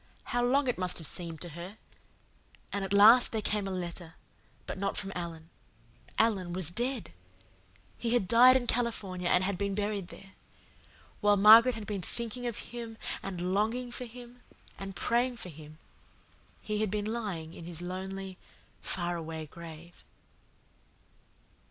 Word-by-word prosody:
How 245 Hz, 0 st, -1 dB
long 265 Hz, +3 st, +3 dB
it 245 Hz, -, 0 dB
must 180 Hz, -1 st, +2 dB
have 160 Hz, -, -4 dB
seemed 165 Hz, +1 st, -4 dB
to 175 Hz, -, -3 dB
her! 175 Hz, +6 st, -8 dB, 1.0 s
And 200 Hz, -1 st, -1 dB
at 195 Hz, -, -4 dB
last 220 Hz, +5 st, +8 dB
there 220 Hz, -, -1 dB
came 210 Hz, -1 st, -1 dB
a -, -, -3 dB
letter 175 Hz, -2 st, -5 dB, 0.5 s
but -, -, -5 dB
not 195 Hz, 0 st, -1 dB
from 195 Hz, -1 st, -4 dB
Alan. 170 Hz, -2 st, -6 dB, 0.7 s
Alan 190 Hz, -6 st, +2 dB
was 175 Hz, -3 st, 0 dB
DEAD. 240 Hz, -, -2 dB, 0.9 s
He 235 Hz, 0 st, +1 dB
had 200 Hz, -6 st, +2 dB
died 245 Hz, +5 st, +8 dB
in 250 Hz, -, -3 dB
California 205 Hz, -7 st, -1 dB
and 180 Hz, -, +4 dB
had 190 Hz, -1 st, -1 dB
been 200 Hz, -1 st, -1 dB
buried 205 Hz, -2 st, -2 dB
there. 195 Hz, +1 st, -13 dB, 0.9 s
While 205 Hz, -1 st, +4 dB
Margaret 225 Hz, +5 st, +8 dB
had 220 Hz, -2 st, -6 dB
been 205 Hz, -2 st, -3 dB
thinking 235 Hz, +5 st, -4 dB
of 235 Hz, -, -4 dB, 0.2 s
him 230 Hz, -2 st, -6 dB, 0.2 s
and 180 Hz, -1 st, -3 dB
longing 230 Hz, +5 st, 0 dB
for 250 Hz, +1 st, -4 dB
him 245 Hz, +1 st, -12 dB, 0.4 s
and 195 Hz, -1 st, -6 dB
praying 240 Hz, +5 st, +1 dB
for 185 Hz, -, -7 dB
him 155 Hz, -1 st, -12 dB, 0.9 s
he 215 Hz, 0 st, -1 dB
had 215 Hz, -, +1 dB
been 205 Hz, +1 st, -2 dB
lying 205 Hz, -8 st, -3 dB
in 170 Hz, -, -9 dB
his 170 Hz, -1 st, -5 dB
lonely, 190 Hz, +1 st, -5 dB, 0.4 s
faraway 165 Hz, -3 st, -3 dB
grave." 170 Hz, +2 st, -12 dB
195 Hz, 155 wpm, -30 LUFS, 175-230 Hz, 1.0 s, last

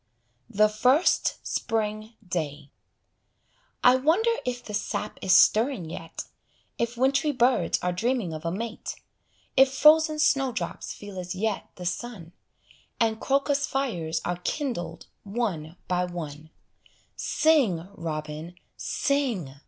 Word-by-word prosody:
THE 215 Hz, +1 st, +4 dB
FIRST 250 Hz, +10 st, +3 dB
SPRING 215 Hz, -1 st, -2 dB
DAY 150 Hz, -5 st, -4 dB, 1.1 s
I 250 Hz, +1 st, +7 dB
wonder 340 Hz, -, +3 dB, 0.2 s
if 245 Hz, -1 st, -3 dB
the 210 Hz, -, -7 dB
sap 210 Hz, 0 st, -3 dB
is 185 Hz, -, +6 dB
stirring 220 Hz, -, +3 dB
yet, 165 Hz, -1 st, -6 dB, 0.6 s
If 235 Hz, +1 st, -1 dB
wintry 275 Hz, +4 st, +2 dB
birds 255 Hz, -1 st, +2 dB
are 180 Hz, -, +1 dB
dreaming 225 Hz, -1 st, -1 dB
of 155 Hz, 0 st, -6 dB
a 165 Hz, -, -1 dB
mate, 225 Hz, +4 st, -5 dB, 0.6 s
If 265 Hz, 0 st, +6 dB
frozen 310 Hz, +3 st, +5 dB
snowdrops 265 Hz, -, 0 dB
feel 205 Hz, -2 st, -8 dB
as 180 Hz, 0 st, -5 dB
yet 215 Hz, +2 st, -2 dB
the 180 Hz, -, -8 dB
sun, 185 Hz, -2 st, -4 dB, 0.7 s
And 225 Hz, -1 st, +1 dB
crocus 280 Hz, +1 st, +1 dB
fires 175 Hz, -13 st, -2 dB
are 175 Hz, 0 st, -1 dB
kindled 180 Hz, -, -3 dB, 0.2 s
one 195 Hz, -7 st, -3 dB
by 180 Hz, 0 st, +1 dB
one: 160 Hz, -3 st, -7 dB, 0.7 s
Sing, 235 Hz, -, +2 dB
robin, 155 Hz, 0 st, -5 dB, 0.2 s
sing! 245 Hz, -, -1 dB
215 Hz, 120 wpm, -26 LUFS, 175-260 Hz, 1.1 s, I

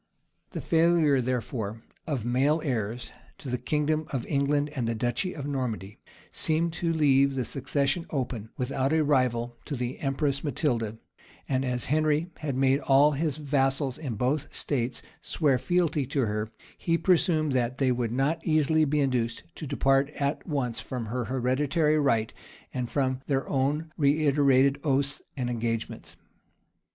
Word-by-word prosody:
The -, -, -5 dB
failure, 160 Hz, -4 st, +3 dB
therefore, 115 Hz, -3 st, -3 dB, 0.2 s
of 135 Hz, -8 st, -2 dB
male 135 Hz, +6 st, +2 dB
heirs 120 Hz, -3 st, -2 dB, 0.3 s
to 135 Hz, -, -8 dB
the 125 Hz, -, -1 dB
kingdom 155 Hz, +3 st, 0 dB
of 130 Hz, -4 st, -2 dB
England 145 Hz, +1 st, +1 dB
and 115 Hz, -3 st, -1 dB
duchy 120 Hz, -, -1 dB
of 140 Hz, -, -5 dB
Normandy, 120 Hz, -8 st, -3 dB, 0.3 s
seemed 160 Hz, +1 st, +1 dB
to 170 Hz, -1 st, -1 dB
leave 140 Hz, -3 st, +3 dB
the 130 Hz, -2 st, -1 dB
succession 140 Hz, +4 st, -1 dB
open, 125 Hz, -6 st, -3 dB
without 135 Hz, +2 st, 0 dB
a 160 Hz, -1 st, +3 dB
rival, 120 Hz, -4 st, +1 dB
to 145 Hz, -, -3 dB
the 125 Hz, 0 st, -4 dB
empress 140 Hz, 0 st, -1 dB
Matilda; 120 Hz, -7 st, -1 dB, 0.5 s
and 130 Hz, -1 st, 0 dB
as 125 Hz, -2 st, -2 dB
Henry 155 Hz, +3 st, +1 dB
had 145 Hz, -4 st, -3 dB
made 135 Hz, +1 st, +3 dB
all 140 Hz, +2 st, +5 dB
his 150 Hz, 0 st, -1 dB
vassals 135 Hz, -2 st, 0 dB
in 130 Hz, -8 st, -4 dB
both 130 Hz, +7 st, -1 dB
states 125 Hz, -3 st, -1 dB, 0.2 s
swear 140 Hz, -6 st, +1 dB
fealty 160 Hz, -4 st, +1 dB
to 140 Hz, -, 0 dB
her, 105 Hz, -2 st, -1 dB, 0.3 s
he 165 Hz, -1 st, +1 dB
presumed 165 Hz, -4 st, +2 dB
that 125 Hz, -1 st, 0 dB
they 130 Hz, -2 st, +2 dB
would 120 Hz, -2 st, -1 dB
not 145 Hz, +6 st, 0 dB
easily 155 Hz, 0 st, +3 dB
be 150 Hz, +1 st, +1 dB
induced 120 Hz, -4 st, 0 dB
to 155 Hz, -, -7 dB
depart 135 Hz, 0 st, +2 dB
at 140 Hz, 0 st, -2 dB
once 135 Hz, -7 st, -1 dB
from 125 Hz, -3 st, -5 dB
her 120 Hz, +2 st, -3 dB
hereditary 140 Hz, +5 st, +1 dB
right, 115 Hz, -6 st, +1 dB, 0.4 s
and 125 Hz, -2 st, -3 dB
from 130 Hz, -2 st, 0 dB
their 135 Hz, -2 st, 0 dB
own 145 Hz, +4 st, 0 dB
reiterated 140 Hz, -2 st, +3 dB
oaths 140 Hz, 0 st, +1 dB, 0.2 s
and 125 Hz, -2 st, -1 dB
engagements. 115 Hz, -1 st, -3 dB
135 Hz, 150 wpm, -27 LUFS, 125-150 Hz, 0.5 s, all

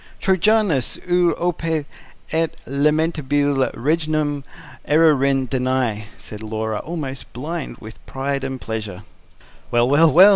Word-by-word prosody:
"TROJANAS 190 Hz, -, +2 dB
UT 175 Hz, -1 st, +3 dB
OPES 165 Hz, -3 st, -1 dB, 0.5 s
ET 165 Hz, 0 st, 0 dB
LAMENTABILE 145 Hz, -1 st, +1 dB
REGNUM 150 Hz, +1 st, 0 dB, 0.4 s
ERUERINT 140 Hz, -4 st, +3 dB
DANAI," 125 Hz, -5 st, 0 dB
said 105 Hz, 0 st, -9 dB
Laura, 110 Hz, 0 st, -3 dB
almost 145 Hz, -4 st, -5 dB
blind 155 Hz, +5 st, -5 dB
with 110 Hz, 0 st, -12 dB
pride 135 Hz, +1 st, -2 dB
and 135 Hz, -1 st, -3 dB
pleasure. 105 Hz, -5 st, -5 dB, 0.7 s
"Well, 120 Hz, 0 st, +3 dB
well, 155 Hz, +4 st, +5 dB
well!" 190 Hz, +5 st, +9 dB
140 Hz, 110 wpm, -21 LUFS, 130-160 Hz, 0.7 s, well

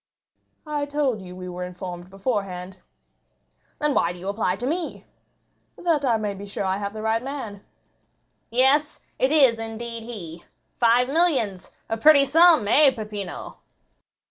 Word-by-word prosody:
"I 295 Hz, -1 st, -2 dB
told 285 Hz, -7 st, -1 dB
you 180 Hz, -1 st, -10 dB
we 185 Hz, 0 st, -8 dB
were 180 Hz, 0 st, -5 dB
informed 180 Hz, 0 st, -7 dB
beforehand." 190 Hz, -3 st, -4 dB, 1.0 s
"Then 300 Hz, -1 st, 0 dB
why 170 Hz, -, +2 dB
do 175 Hz, -, -9 dB
you 185 Hz, +3 st, -5 dB
apply 200 Hz, -3 st, 0 dB
to 230 Hz, +5 st, -5 dB
me?" 330 Hz, +4 st, -3 dB, 0.7 s
"That 330 Hz, -5 st, 0 dB
I 240 Hz, -4 st, +2 dB
may 210 Hz, -2 st, -2 dB
be 200 Hz, +1 st, -9 dB
sure 200 Hz, 0 st, -4 dB
I 190 Hz, 0 st, 0 dB
have 200 Hz, 0 st, -4 dB
the 215 Hz, -, -6 dB
right 220 Hz, +1 st, +1 dB
man." 250 Hz, -7 st, -6 dB, 0.9 s
"Yes, 270 Hz, +5 st, +2 dB, 0.2 s
it 260 Hz, +2 st, +2 dB
is 265 Hz, -7 st, +5 dB
indeed 230 Hz, +1 st, -5 dB
he. 175 Hz, -8 st, -8 dB, 0.4 s
Five 240 Hz, +1 st, +4 dB
millions—a 250 Hz, -, 0 dB
pretty 280 Hz, +3 st, +6 dB
sum, 320 Hz, -4 st, +5 dB
eh, 290 Hz, +6 st, +6 dB
Peppino?" 210 Hz, -4 st, -6 dB
225 Hz, 145 wpm, -24 LUFS, 195-275 Hz, 1.0 s, pretty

